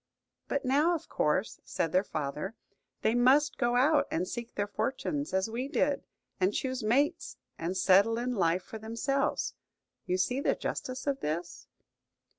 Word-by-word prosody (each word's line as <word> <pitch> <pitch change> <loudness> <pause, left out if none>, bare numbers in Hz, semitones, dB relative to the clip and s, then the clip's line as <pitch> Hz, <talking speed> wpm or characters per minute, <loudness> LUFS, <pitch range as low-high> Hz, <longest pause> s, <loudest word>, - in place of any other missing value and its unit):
"But 280 - -1
now, 295 +7 +3
of 320 - -6
course," 155 +7 0
said 165 - -2
their 185 +3 +3
father, 155 +4 -4 0.5
"they 220 - +3
must 260 +3 +4
go 240 -1 +2
out 290 +5 +4
and 180 +3 -1
seek 235 +3 -6
their 205 - 0
fortunes, 270 +7 -2
as 190 +1 +1
we 240 +4 -3
did, 280 0 0 0.3
and 190 +2 +2
choose 260 -1 -2
mates, 245 +7 +1 0.2
and 175 +3 -2
settle 200 +5 +5
in 250 +1 -1
life 180 -3 +1
for 220 - -8
themselves. 230 +5 -1 0.5
You 180 - +1
see 250 +9 0
the - - +2
justice 255 0 -4
of 280 -1 0
this?" 170 +3 -4
230 Hz, 160 wpm, -30 LUFS, 185-270 Hz, 0.5 s, settle